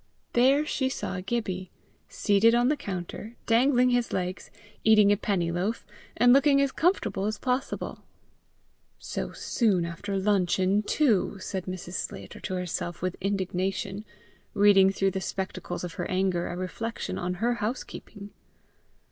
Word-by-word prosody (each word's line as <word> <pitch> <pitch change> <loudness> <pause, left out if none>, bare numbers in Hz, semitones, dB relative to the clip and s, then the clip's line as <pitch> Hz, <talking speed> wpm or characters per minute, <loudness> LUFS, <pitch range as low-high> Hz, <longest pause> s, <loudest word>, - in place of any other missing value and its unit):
There 270 +5 +4
she 265 -3 0
saw 190 -7 -4
Gibbie, 190 -3 -3 0.4
seated 215 +3 +3
on 240 +1 +3
the 300 - +2
counter, 200 - -6
dangling 250 +2 +4
his 245 -1 +1
legs, 180 0 -3 0.3
eating 215 -2 +6
a - - +5
penny 190 -5 -1
loaf, 190 +7 -2 0.3
and 245 +2 +6
looking 275 +1 +5
as 275 -1 +2
comfortable 325 - 0
as 215 0 -1
possible. 255 +2 -2 1.0
"So - - -5
soon 200 -8 +1
after 195 +4 -4
luncheon, 190 0 +2
too!" 215 -4 +1
said 190 -1 -5
Mrs. 185 -1 -6
Sclater - - -5
to 185 - -4
herself 175 -1 -4
with 185 0 -1
indignation, 195 +1 -2 0.5
reading 200 -1 +6
through 195 0 +1
the 190 - -3
spectacles 185 -2 -4
of 175 -2 -5
her - - -4
anger 185 -2 0
a 175 - -5
reflection 225 +5 -4
on 180 +1 -2
her 235 +6 +1
housekeeping. 210 -2 -5
200 Hz, 140 wpm, -27 LUFS, 185-235 Hz, 1.0 s, eating